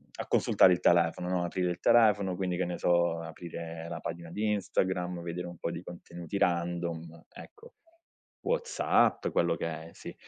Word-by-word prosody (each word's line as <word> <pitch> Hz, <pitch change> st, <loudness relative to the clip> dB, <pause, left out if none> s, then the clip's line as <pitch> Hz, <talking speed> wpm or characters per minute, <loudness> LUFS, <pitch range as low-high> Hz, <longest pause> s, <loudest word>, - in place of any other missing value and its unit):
a -, -, -6 dB
consultare 90 Hz, -, +5 dB
il 90 Hz, -, -1 dB
telefono 85 Hz, 0 st, +3 dB
no, 90 Hz, -1 st, 0 dB
aprire 90 Hz, 0 st, -1 dB
il 85 Hz, -, -5 dB
telefono, 105 Hz, -5 st, +4 dB
quindi, 90 Hz, -1 st, -2 dB
che 95 Hz, -, 0 dB
ne 90 Hz, -, -4 dB
so, 85 Hz, -1 st, +2 dB
aprire 85 Hz, 0 st, -7 dB
la -, -, -5 dB
pagina 85 Hz, 0 st, -6 dB
di 105 Hz, +3 st, 0 dB
Instagram, 90 Hz, -3 st, -1 dB
vedere 85 Hz, +1 st, -4 dB
un 85 Hz, -1 st, -9 dB
po' 85 Hz, -, -3 dB
di 85 Hz, 0 st, -6 dB
contenuti 85 Hz, +1 st, -7 dB
random, 85 Hz, -2 st, -1 dB
ecco, 455 Hz, +3 st, -13 dB, 0.7 s
Whatsapp, -, -, +1 dB
quello -, -, +1 dB
che -, -, -3 dB
è, -, -, -6 dB
sì. -, -, -9 dB
85 Hz, 170 wpm, -30 LUFS, 85-95 Hz, 0.7 s, consultare